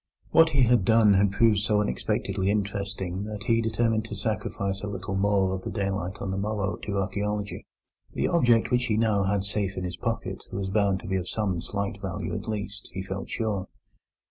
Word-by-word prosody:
What 165 0 +7
he 140 -4 +3
had 120 -4 +4
done 110 -1 +5
had 100 0 +4
proved 105 0 +4
so 105 0 +2
unexpectedly 95 +3 -1
interesting 100 -2 -2
that 105 -1 -6
he 115 0 +2
determined 115 0 +1
to 105 - -6
sacrifice 100 -2 -2
a 105 - -4
little 100 0 -4
more 95 -1 +2
of 95 - -3
the - - -5
daylight 95 -2 -2
on 95 - -3
the 95 - -2
morrow 100 -3 -1
to 100 -1 -4
archaeology. 105 +1 -2 0.5
The - - 0
object 120 -9 +3
which 125 0 +3
he 110 -3 +1
now 110 -3 +2
had 100 0 +1
safe 100 -1 -2
in 90 - -2
his 90 -1 -4
pocket - - -3
was 95 0 -3
bound 100 -2 +2
to - - -9
be 95 0 0
of 90 -1 -4
some 95 -6 -1
slight 100 +2 -3
value - - -4
at - - -4
least, 105 -2 -4
he 95 - -4
felt 95 0 -5
sure. 105 -5 -2
100 Hz, 200 wpm, -27 LUFS, 95-110 Hz, 0.5 s, What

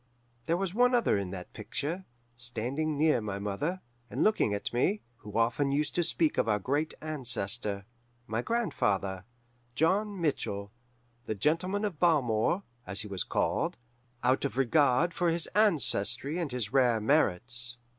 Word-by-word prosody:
There 170 - +2
was 190 -1 -2
one 245 +3 +4
other 235 - +3
in 100 -2 -2
that 90 -1 -8
picture, 170 +7 -4 0.3
standing 125 +6 -3
near 150 -5 +3
my 100 -2 -4
mother, 105 - -3 0.3
and - - -1
looking 215 - +2
at 100 +3 -3
me, 190 - +1
who 105 -2 -7
often 120 +5 +1
used 145 +1 0
to 175 - +1
speak 160 -1 +1
of - - +1
our 105 - +3
great 145 +9 -1
ancestor 120 -9 +1 0.4
my 110 -1 -2
grandfather, 100 - -1 0.5
John 195 +5 +1
Mitchell, 100 -11 -2 0.6
the 110 - -2
Gentleman 180 - 0
of 180 -8 -4
Balmore, 150 - +2 0.2
as 100 +4 -1
he 110 - -7
was 95 -3 -3
called, - - -1 0.5
out 130 +2 +2
of 140 -2 -3
regard 140 +4 +3
for 175 -2 +1
his 165 0 +3
ancestry 165 - +2
and 165 -6 -2
his 120 -4 -3
rare 125 -4 +4
merits. 120 - +2
135 Hz, 155 wpm, -30 LUFS, 110-170 Hz, 0.6 s, one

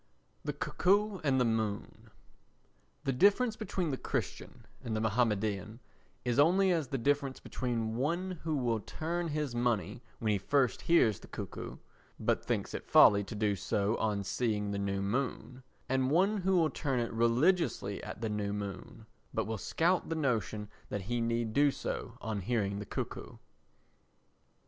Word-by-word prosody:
The - - -2
Cuckoo 200 +2 +1
and 135 -3 +3
the 125 - +3
Moon 110 -3 -2 0.9
The 135 - 0
difference 205 - +4
between 185 -7 -2
the 135 - -2
Christian - - -4 0.2
and 110 - -2
the - - 0
Mahomedan 110 -1 0 0.5
is 125 +2 +1
only 185 +6 +5
as 160 -5 +1
the 135 - -2
difference 140 +1 0
between 115 -3 -2
one 170 +6 -1
who 160 -1 0
will 120 -4 +1
turn 170 - -3
his 150 -4 -2
money 115 -4 0 0.2
when 110 -3 0
he 100 - +1
first 130 +5 +1
hears 120 - +4
the - - -13
cuckoo, - - -6 0.4
but - - +1
thinks - - -2
it - - -5
folly 100 0 +7
to 110 - -7
do 105 -1 +1
so 100 +3 0
on 105 -2 0
seeing 105 -1 -1
the 100 - -2
new 100 0 -1
moon, 125 +3 -2 0.3
and 130 0 +1
one 190 +8 +3
who 190 -1 +2
will 160 -2 +3
turn 135 -5 -1
it 115 -1 -2
religiously 115 - +2
at - - -7
the 115 - -1
new 105 -1 -2
moon, 100 -2 -6 0.3
but - - +1
will 110 -1 -3
scout 175 - +1
the 165 - -1
notion 110 -8 -1 0.2
that 105 - -3
he 120 +5 -2
need 115 -1 0
do 145 +3 +5
so 120 -3 -4
on 110 -3 -3
hearing 100 -2 -1
the 105 - -7
cuckoo. - - -5
120 Hz, 165 wpm, -32 LUFS, 105-155 Hz, 0.9 s, folly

